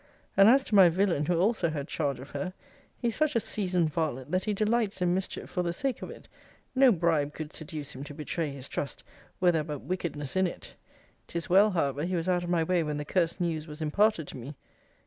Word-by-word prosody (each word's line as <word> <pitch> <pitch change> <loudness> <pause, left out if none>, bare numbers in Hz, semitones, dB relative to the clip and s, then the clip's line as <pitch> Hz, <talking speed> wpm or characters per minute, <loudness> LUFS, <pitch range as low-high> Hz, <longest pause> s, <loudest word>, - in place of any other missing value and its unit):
And 195 +2 +7
as 265 +3 +6
to 230 - -7
my 190 -4 +8
villain, 170 -4 +1
who 175 - +2
also 190 -3 +2
had 145 -2 -4
charge 145 -6 -1
of 135 +2 -10
her, 185 -1 -4 0.4
he 240 - 0
is 230 - -2
such 310 -3 +1
a - - +5
seasoned 180 -7 0
varlet, 145 -4 -2
that 185 +1 0
he 210 - 0
delights 215 -1 +1
in 180 -1 +2
mischief 190 +1 -3
for 180 - -2
the 175 -1 -1
sake 265 +7 -2
of - - -6
it: - - -11 0.5
no 265 -1 +6
bribe 160 -6 +1
could 155 -1 -6
seduce 150 -2 -6
him 130 - -7
to 145 - -9
betray 155 +1 -2
his 140 -1 -7
trust, 140 - -4 0.4
were 180 -1 +5
there 160 -2 0
but 150 -3 -5
wickedness 155 -6 -4
in 190 0 +3
it! - - -8 0.5
'Tis 170 0 -4
well, 200 +3 +7
however, 145 -6 0
he 180 +2 -1
was 165 0 -1
out 180 -1 +2
of 175 - -4
my 170 -2 +2
way 180 +1 +2
when 150 -2 -2
the 150 - -4
cursed 170 +1 0
news 165 -3 -2
was 150 0 -9
imparted 165 +1 +2
to - - -8
me! 130 +4 -8
170 Hz, 235 wpm, -29 LUFS, 150-190 Hz, 0.5 s, my